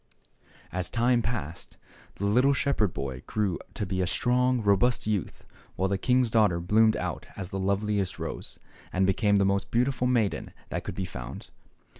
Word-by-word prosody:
As 90 Hz, 0 st, -1 dB
time 120 Hz, +1 st, +2 dB
passed, 100 Hz, -9 st, -5 dB, 0.4 s
the 100 Hz, -, -3 dB
little 125 Hz, +7 st, +4 dB
shepherd 130 Hz, -8 st, +1 dB
boy 65 Hz, -4 st, -5 dB
grew 100 Hz, -5 st, -1 dB, 0.2 s
to 105 Hz, -, -2 dB
be 95 Hz, 0 st, -1 dB
a 90 Hz, -, 0 dB
strong, 125 Hz, +5 st, +2 dB
robust 100 Hz, +4 st, +3 dB
youth, 105 Hz, -4 st, -2 dB, 0.3 s
while 95 Hz, +1 st, 0 dB
the 100 Hz, 0 st, 0 dB
king's 125 Hz, +1 st, +2 dB
daughter 105 Hz, -7 st, +3 dB
bloomed 110 Hz, +5 st, +3 dB
out -, -, -4 dB
as 95 Hz, -3 st, -5 dB
the 95 Hz, -1 st, -4 dB
loveliest 100 Hz, 0 st, 0 dB
rose, -, -, -6 dB, 0.3 s
and 95 Hz, +1 st, +2 dB
became 100 Hz, +2 st, +2 dB
the 100 Hz, -1 st, +4 dB
most 100 Hz, 0 st, 0 dB
beautiful 125 Hz, +1 st, +1 dB
maiden 115 Hz, -5 st, 0 dB, 0.2 s
that -, -, -3 dB
could -, -, -5 dB
be 95 Hz, -, -2 dB
found. 65 Hz, -6 st, -8 dB
100 Hz, 170 wpm, -27 LUFS, 95-120 Hz, 0.4 s, little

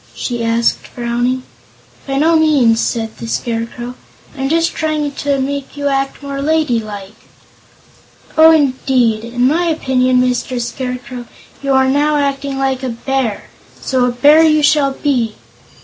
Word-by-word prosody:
she 240 Hz, -2 st, -3 dB
asked, 230 Hz, 0 st, +1 dB
frowning. 245 Hz, +1 st, -2 dB, 0.6 s
"By 270 Hz, 0 st, -1 dB
no 320 Hz, +4 st, +3 dB
means," 285 Hz, -8 st, +3 dB
said 225 Hz, -2 st, -2 dB
the 230 Hz, -, -7 dB
Scarecrow; 235 Hz, +1 st, -4 dB, 0.4 s
"I'm 270 Hz, -1 st, -2 dB
just 330 Hz, +1 st, +1 dB
trying 305 Hz, -2 st, -1 dB
to 280 Hz, 0 st, -1 dB
make 280 Hz, +1 st, -4 dB
you 285 Hz, 0 st, -1 dB
act 270 Hz, +1 st, -2 dB
more 280 Hz, 0 st, -4 dB
ladylike." 230 Hz, -10 st, -1 dB, 1.2 s
"Oh, 320 Hz, 0 st, +8 dB
indeed! 260 Hz, -7 st, +2 dB
In 245 Hz, +1 st, -1 dB
my 335 Hz, +6 st, +1 dB
opinion, 260 Hz, -6 st, +1 dB
Mr. 250 Hz, 0 st, 0 dB
Scarecrow, 250 Hz, 0 st, -5 dB, 0.3 s
you 275 Hz, -1 st, 0 dB
are 265 Hz, 0 st, +4 dB
now 290 Hz, +3 st, +2 dB
acting 280 Hz, -1 st, -2 dB
like 270 Hz, -1 st, -1 dB
a 260 Hz, -, -3 dB
bear 240 Hz, -2 st, -2 dB, 0.4 s
so 255 Hz, -2 st, 0 dB
a 250 Hz, -, +1 dB
Bear 290 Hz, +6 st, +5 dB
you 310 Hz, -2 st, +4 dB
shall 290 Hz, -2 st, +3 dB
be!" 245 Hz, -7 st, -1 dB
265 Hz, 145 wpm, -16 LUFS, 240-285 Hz, 1.2 s, Oh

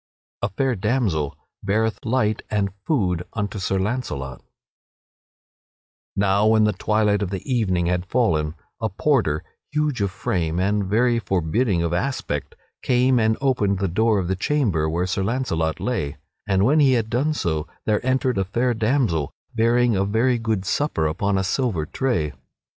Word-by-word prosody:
[Sidenote: 100 Hz, -, 0 dB
A -, -, -32 dB
fair 130 Hz, +1 st, +1 dB
damsel 100 Hz, -, 0 dB, 0.3 s
beareth 110 Hz, +2 st, 0 dB
light 110 Hz, -3 st, +1 dB
and 100 Hz, -2 st, 0 dB
food 90 Hz, -, +1 dB
unto 105 Hz, -1 st, -3 dB
Sir 95 Hz, 0 st, 0 dB
Launcelot] 95 Hz, -, -3 dB, 1.7 s
Now 100 Hz, +1 st, +3 dB
when 110 Hz, 0 st, +5 dB
the 105 Hz, 0 st, +3 dB
twilight 105 Hz, +1 st, +1 dB
of 100 Hz, -, -1 dB
the 95 Hz, -1 st, -5 dB
evening 100 Hz, -9 st, +1 dB
had 90 Hz, +1 st, -1 dB
fallen, 80 Hz, -10 st, +1 dB, 0.2 s
a 110 Hz, -, -1 dB
porter, 100 Hz, -, +1 dB, 0.3 s
huge 150 Hz, -6 st, 0 dB
of 100 Hz, -, +1 dB
frame 85 Hz, -2 st, -2 dB
and 100 Hz, +2 st, +1 dB
very 120 Hz, +4 st, +2 dB
forbidding 95 Hz, 0 st, 0 dB
of 85 Hz, 0 st, -1 dB
aspect, 85 Hz, -, -2 dB, 0.3 s
came 125 Hz, 0 st, +3 dB
and 110 Hz, 0 st, +2 dB
opened 115 Hz, -8 st, +1 dB
the 95 Hz, +1 st, 0 dB
door 110 Hz, +5 st, +2 dB
of 95 Hz, -3 st, -1 dB
the 95 Hz, -, 0 dB
chamber 95 Hz, -, +1 dB
where 85 Hz, +3 st, 0 dB
Sir 95 Hz, +1 st, -1 dB
Launcelot 95 Hz, -8 st, -1 dB
lay, 80 Hz, -, -2 dB, 0.3 s
and 95 Hz, 0 st, +3 dB
when 150 Hz, +6 st, +4 dB
he 135 Hz, -3 st, +5 dB
had 115 Hz, -3 st, +1 dB
done 135 Hz, +7 st, 0 dB
so 80 Hz, -, -1 dB, 0.2 s
there 105 Hz, +1 st, +1 dB
entered 130 Hz, -3 st, +1 dB
a -, -, +2 dB
fair 120 Hz, +6 st, 0 dB
damsel, 110 Hz, -, +1 dB, 0.2 s
bearing 120 Hz, 0 st, +3 dB
a 95 Hz, -, +2 dB
very 115 Hz, +5 st, +1 dB
good 110 Hz, -4 st, -1 dB
supper 145 Hz, -, 0 dB
upon 95 Hz, +6 st, 0 dB
a 95 Hz, -, +1 dB
silver 100 Hz, -, 0 dB
tray. 85 Hz, -, -1 dB
105 Hz, 165 wpm, -23 LUFS, 90-120 Hz, 1.7 s, when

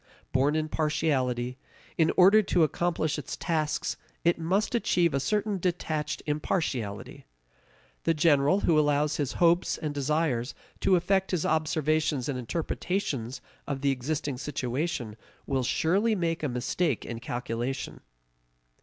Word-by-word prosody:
Born 140 Hz, +3 st, +2 dB
in 155 Hz, 0 st, 0 dB
partiality, 130 Hz, -6 st, 0 dB, 0.4 s
in 160 Hz, -1 st, +3 dB
order 195 Hz, +4 st, +7 dB
to 180 Hz, -4 st, +2 dB
accomplish 160 Hz, -1 st, 0 dB
its 145 Hz, -, -6 dB
tasks 155 Hz, -3 st, -1 dB, 0.3 s
it 170 Hz, 0 st, +2 dB
must 190 Hz, +8 st, 0 dB
achieve 175 Hz, -8 st, +2 dB
a 140 Hz, -, +1 dB
certain 210 Hz, +5 st, 0 dB
detached 155 Hz, -4 st, -2 dB
impartiality. 145 Hz, -, -2 dB, 0.8 s
The 165 Hz, -, +3 dB
general 150 Hz, +4 st, +4 dB
who 160 Hz, -2 st, +4 dB
allows 150 Hz, 0 st, +2 dB
his 145 Hz, -3 st, -1 dB
hopes 175 Hz, 0 st, +3 dB
and 150 Hz, -2 st, -3 dB
desires 145 Hz, -3 st, 0 dB, 0.2 s
to 190 Hz, -, +4 dB
affect 190 Hz, +2 st, +1 dB
his 180 Hz, -4 st, 0 dB
observations 155 Hz, -3 st, +1 dB
and 135 Hz, -3 st, -2 dB
interpretations 135 Hz, -, -3 dB, 0.3 s
of 140 Hz, -2 st, -3 dB
the 140 Hz, 0 st, +2 dB
existing 140 Hz, 0 st, -2 dB
situation 130 Hz, -3 st, -3 dB, 0.3 s
will 135 Hz, -1 st, 0 dB
surely 190 Hz, -, +2 dB
make 165 Hz, -3 st, -1 dB
a 150 Hz, -, -1 dB
mistake 130 Hz, +3 st, -1 dB
in 115 Hz, -1 st, -5 dB
calculation. 120 Hz, +2 st, -4 dB
150 Hz, 130 wpm, -28 LUFS, 130-170 Hz, 0.8 s, order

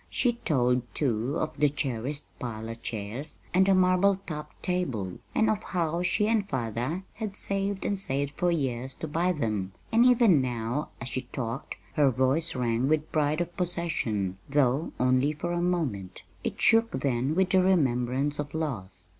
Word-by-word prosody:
She 245 Hz, -2 st, +1 dB
told, 125 Hz, -, +1 dB
too, 130 Hz, +1 st, 0 dB
of 155 Hz, -, -2 dB
the 150 Hz, -, +5 dB
cherished 140 Hz, 0 st, -3 dB
parlor 115 Hz, -2 st, -4 dB
chairs 115 Hz, +5 st, -5 dB, 0.2 s
and 190 Hz, +1 st, +4 dB
marble 185 Hz, +2 st, +4 dB
topped 150 Hz, -2 st, -7 dB
table, 130 Hz, -, -2 dB, 0.2 s
and 220 Hz, -, +3 dB
of 215 Hz, -1 st, +1 dB
how 170 Hz, -2 st, -1 dB
she 180 Hz, +4 st, +2 dB
and 215 Hz, -3 st, +1 dB
father 125 Hz, -, -2 dB
had 215 Hz, -3 st, -5 dB
saved 195 Hz, -1 st, 0 dB
and 200 Hz, -2 st, 0 dB
saved 140 Hz, -5 st, -1 dB
for 175 Hz, +4 st, 0 dB
years 130 Hz, -5 st, -1 dB
to 160 Hz, -, -5 dB
buy 170 Hz, +4 st, +1 dB
them; 105 Hz, -, -2 dB, 0.2 s
and 230 Hz, +1 st, +5 dB
even 235 Hz, -, +6 dB
now, 120 Hz, +3 st, -2 dB
as 120 Hz, -, -5 dB
she 130 Hz, -, -2 dB
talked, 115 Hz, -4 st, -4 dB, 0.2 s
her 145 Hz, -2 st, +4 dB
voice 130 Hz, +6 st, +1 dB
rang 120 Hz, 0 st, +1 dB
with 155 Hz, 0 st, +1 dB
pride 155 Hz, +1 st, +1 dB
of 175 Hz, 0 st, -4 dB
possession 125 Hz, -, -1 dB
though 140 Hz, +1 st, +2 dB
only 130 Hz, +3 st, +3 dB
for 170 Hz, +4 st, -4 dB
a 175 Hz, 0 st, 0 dB
moment; 150 Hz, -, -2 dB, 0.2 s
it -, -, -3 dB
shook 225 Hz, 0 st, +5 dB
then 135 Hz, +2 st, 0 dB
with 190 Hz, 0 st, +2 dB
the 190 Hz, -, +5 dB
remembrance 140 Hz, -5 st, +1 dB
of 145 Hz, +1 st, -4 dB
loss. 95 Hz, -, -3 dB
145 Hz, 165 wpm, -28 LUFS, 120-180 Hz, 0.2 s, even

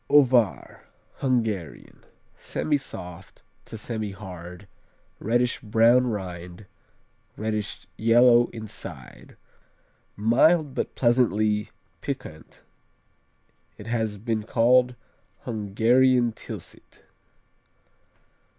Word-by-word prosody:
Ovár 125 Hz, -7 st, +3 dB, 0.4 s
Hungarian 110 Hz, -, -2 dB, 0.3 s
Semisoft 135 Hz, -, -5 dB, 0.2 s
to 110 Hz, -, -8 dB
semihard, 95 Hz, -5 st, -7 dB, 0.5 s
reddish 120 Hz, +3 st, 0 dB
brown 115 Hz, +3 st, +4 dB
rind, 90 Hz, -3 st, -6 dB, 0.7 s
reddish 110 Hz, -1 st, -3 dB
yellow 120 Hz, +1 st, +5 dB
inside. 100 Hz, -, -10 dB, 0.8 s
Mild 135 Hz, +8 st, +3 dB
but -, -, -3 dB
pleasantly 110 Hz, -4 st, +2 dB, 0.3 s
piquant 80 Hz, 0 st, -7 dB, 1.1 s
It -, -, -11 dB
has 110 Hz, -3 st, -2 dB
been 110 Hz, +1 st, -2 dB
called 125 Hz, +2 st, +3 dB, 0.5 s
Hungarian 120 Hz, +3 st, +2 dB
Tilsit. 110 Hz, -, -11 dB
110 Hz, 70 wpm, -25 LUFS, 105-125 Hz, 1.1 s, yellow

